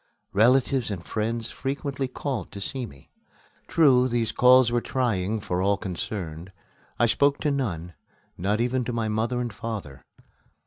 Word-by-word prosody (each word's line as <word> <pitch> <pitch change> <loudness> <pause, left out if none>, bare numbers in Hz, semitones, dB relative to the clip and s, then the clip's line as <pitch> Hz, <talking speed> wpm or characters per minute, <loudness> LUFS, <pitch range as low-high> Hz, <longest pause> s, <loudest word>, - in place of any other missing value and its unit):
Relatives 125 +3 +3
and 90 -4 -5
friends 115 +1 -2
frequently 135 0 -3
called 130 -1 -4
to 100 - -8
see 125 +4 -4
me. 70 -8 -17 0.6
True, 130 -6 +5
these 115 -3 0
calls 125 0 +6
were 120 0 +1
trying 110 -6 0
for 90 -2 -2
all 100 +1 +2
concerned. 90 -3 -5 0.5
I 120 - +4
spoke 140 +5 +3
to 150 - +1
none, 90 - -2 0.4
not 100 +5 0
even 125 +2 +1
to 125 - -3
my 115 -2 -1
mother 115 +3 0
and 120 -3 -3
father. 105 - -6
115 Hz, 150 wpm, -26 LUFS, 100-130 Hz, 0.6 s, calls